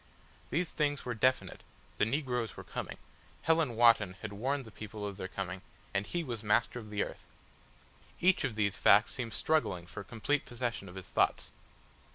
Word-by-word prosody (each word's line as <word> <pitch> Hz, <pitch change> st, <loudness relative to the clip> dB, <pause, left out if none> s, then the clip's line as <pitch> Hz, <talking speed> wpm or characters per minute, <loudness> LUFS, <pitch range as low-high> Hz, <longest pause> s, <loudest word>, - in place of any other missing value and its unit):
These 175 Hz, +3 st, 0 dB
things 145 Hz, -2 st, 0 dB
were 125 Hz, -, -1 dB
definite, 130 Hz, +4 st, +1 dB, 0.4 s
the 105 Hz, -, +4 dB
negroes 125 Hz, -, -1 dB
were -, -, -7 dB
coming, -, -, -5 dB, 0.5 s
Helen 160 Hz, -7 st, +3 dB
Wotton 115 Hz, -5 st, +5 dB
had 105 Hz, -1 st, -4 dB
warned 135 Hz, +6 st, -1 dB
the 110 Hz, -, -11 dB
people 105 Hz, 0 st, -7 dB
of 100 Hz, -1 st, -4 dB
their 95 Hz, -, -4 dB
coming, 95 Hz, -1 st, -4 dB, 0.3 s
and 100 Hz, +1 st, 0 dB
he 175 Hz, -1 st, -1 dB
was 120 Hz, -7 st, -4 dB
Master 115 Hz, +3 st, +2 dB
of 110 Hz, -2 st, -10 dB
the 105 Hz, -1 st, 0 dB
Earth. -, -, -8 dB, 0.9 s
Each 185 Hz, +1 st, +4 dB
of 110 Hz, -, -1 dB
these 100 Hz, -3 st, +1 dB
facts 105 Hz, +3 st, +6 dB
seemed 115 Hz, -4 st, -3 dB
struggling 100 Hz, -, +1 dB
for 85 Hz, +3 st, -7 dB
complete 120 Hz, +8 st, 0 dB
possession 120 Hz, -5 st, -3 dB
of 90 Hz, -, -11 dB
his 95 Hz, -, -7 dB
thoughts. -, -, +1 dB
115 Hz, 180 wpm, -32 LUFS, 100-135 Hz, 0.9 s, facts